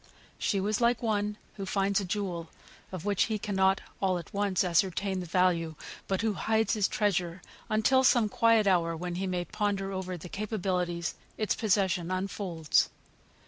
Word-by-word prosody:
She 200 - +1
was 210 +4 0
like 240 0 +2
one 210 -2 0 0.2
who 195 - -4
finds 195 +1 +1
a - - -4
jewel 180 -4 -3 0.4
of 185 -2 -6
which 205 -2 +2
he 220 -1 -1
cannot 195 -2 +1 0.2
all 190 -2 +2
at 170 - -9
once 200 -3 +1
ascertain 185 +2 +1
the 180 - -5
value, 170 -2 +1 0.3
but 190 0 0
who 220 -2 +1
hides 220 +3 +1
his 210 -3 +2
treasure 185 -4 0 0.3
until 220 +5 +3
some 240 -4 +5
quiet 225 +1 +3
hour 170 -4 +2
when 175 +1 -4
he 190 +2 -2
may 180 -1 -1
ponder 195 +1 -1
over 185 -1 -4
the 170 - -9
capabilities 180 -4 -2 0.2
its 215 - +1
possession 190 -5 +1
unfolds. 185 -4 0
195 Hz, 165 wpm, -29 LUFS, 180-210 Hz, 0.4 s, some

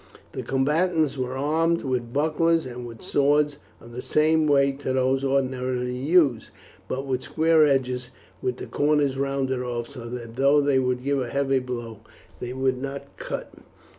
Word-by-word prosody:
The - - -5
combatants 155 +3 +1
were 130 -1 -3
armed 165 +4 +1
with 125 -3 -2
bucklers 160 +3 +2
and 125 -1 -7
with 115 -1 -11
swords 145 +1 +2 0.2
of 115 - -14
the 125 +2 -6
same 155 +2 +2
weight 140 -1 +3
to 130 -2 -2
those 130 +1 +1
ordinarily 130 -2 0
used, 140 -3 +2 0.4
but 135 +1 -3
with 130 -2 -1
square 160 -1 +3
edges 125 -2 0 0.3
with 125 0 -2
the - - -6
corners 145 -2 +1
rounded 135 -1 -1
off, 120 -1 -4
so 120 -1 -8
that 120 -1 -7
though 140 +2 +5
they 140 -2 +3
would 125 -1 -1
give 140 0 0
a 125 - -3
heavy 135 +1 +1
blow 120 -4 -6 0.4
they 125 - -5
would 130 0 -1
not 140 0 -6
cut. - - -6
135 Hz, 165 wpm, -25 LUFS, 125-145 Hz, 0.4 s, though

